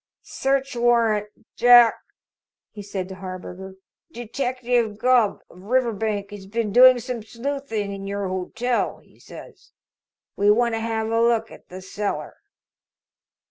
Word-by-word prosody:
"Search 270 -1 -1
warrant, 230 -3 +2 0.3
Jack," 240 -1 +6 0.7
he 210 - -9
said 195 -2 -5
to - - -7
Harburger. 185 0 -8 0.4
"Detective 240 -2 -2
Gubb, 240 -2 +2
of 180 - -17
Riverbank, 220 -3 -1
has 200 -2 -10
been 220 0 -2
doing 255 +1 +8
some 245 -1 -5
sleuthing 230 -3 -4
in 195 0 -7
your 200 0 -3
hotel, 225 +7 -2
he - - -25
says. - - -14 0.6
We 205 +1 +2
want 235 +2 +3
to 225 - -1
have 225 0 -2
a 230 0 +2
look 230 -1 +1
at - - -15
the 185 +1 -9
cellar." 205 +2 -4
225 Hz, 135 wpm, -23 LUFS, 200-245 Hz, 0.7 s, doing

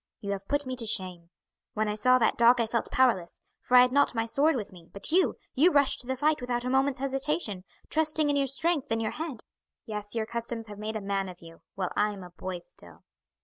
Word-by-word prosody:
You 200 - -4
have 195 0 -5
put 285 0 0
me 255 0 -4
to 235 - -2
shame. 180 -5 -1 0.5
When 215 0 0
I 210 - -1
saw 255 +4 +4
that 230 -3 +2
dog 235 +1 +5
I 230 - +2
felt 230 +1 -2
powerless, 230 -10 +1 0.2
for 250 - +3
I - - +10
had 250 0 +4
not 280 -1 +3
my 225 0 0
sword 280 +8 +2
with 220 -5 -4
me; 175 -2 -15
but 200 +8 -5
you 370 +3 +3 0.2
you 320 +7 +4
rushed 285 -3 +3
to 245 - -8
the 260 - -1
fight 300 +3 +1
without 245 0 -2
a 250 - -1
moment's 270 0 +2
hesitation, 270 - -2 0.2
trusting 310 0 +1
in 290 - +1
your 280 -1 +1
strength 295 +2 0
and 225 0 0
your 220 -1 -1
head. 310 -8 -6 0.4
Yes, 210 0 -5
your 225 -1 0
customs 235 0 -4
have 205 -1 -10
made 215 +1 -4
a 215 - -3
man 195 -1 -2
of 180 - -11
you, 165 0 -14
while 185 -2 -2
I 210 0 +1
am 195 -2 -9
a 180 - -11
boy 185 +1 -5
still." 85 - -16
235 Hz, 245 wpm, -28 LUFS, 200-270 Hz, 0.5 s, I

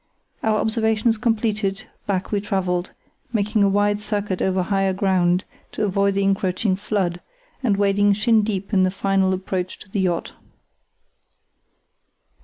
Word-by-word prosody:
Our 215 -1 +1
observations 220 0 +1
completed, 215 -3 -1 0.2
back 190 -2 -1
we 205 -2 0
travelled, 185 -3 -1 0.4
making 215 -1 +1
a 200 - +5
wide 205 +1 +2
circuit 205 -3 -2
over 190 -1 +1
higher 195 0 +1
ground 185 -1 +2 0.3
to 215 - -1
avoid 200 0 +1
the 200 - +1
encroaching 195 0 +1
flood, 190 -3 -2 0.4
and 215 -7 +1
wading 205 0 +3
shin 220 +2 +3
deep 205 -1 -3
in 190 - +4
the 185 - +3
final 195 0 +1
approach 185 -1 -3
to - - -13
the 200 - -1
yacht. 180 -3 -1
200 Hz, 140 wpm, -22 LUFS, 190-210 Hz, 0.4 s, a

